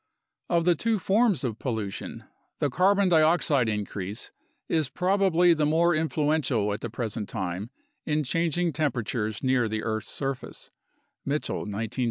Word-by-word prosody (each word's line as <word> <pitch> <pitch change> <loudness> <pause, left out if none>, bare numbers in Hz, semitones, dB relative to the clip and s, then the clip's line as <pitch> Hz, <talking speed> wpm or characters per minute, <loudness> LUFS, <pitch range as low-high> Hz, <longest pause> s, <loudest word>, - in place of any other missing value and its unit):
Of 170 -1 +2
the 175 - +5
two 225 +7 0
forms 205 -2 +2
of 115 -4 -3
pollution, 110 -6 -4 0.3
the 145 - 0
carbon 195 +5 +3
dioxide 155 -6 +3
increase 105 -1 -4 0.4
is 155 -5 +1
probably 180 -2 +3
the 155 -2 +1
more 170 +3 +3
influential 150 -8 +1
at 105 - -5
the 115 - -4
present 110 -2 -4
time 95 +3 -4 0.3
in 150 0 0
changing 165 +3 0
temperatures 120 -7 -2
near 130 -3 +2
the 110 0 -2
earth's 110 -1 -2
surface 135 -2 -5 0.5
(Mitchell, 145 -5 -2
1973a). 110 +4 -4
145 Hz, 140 wpm, -27 LUFS, 110-170 Hz, 0.5 s, the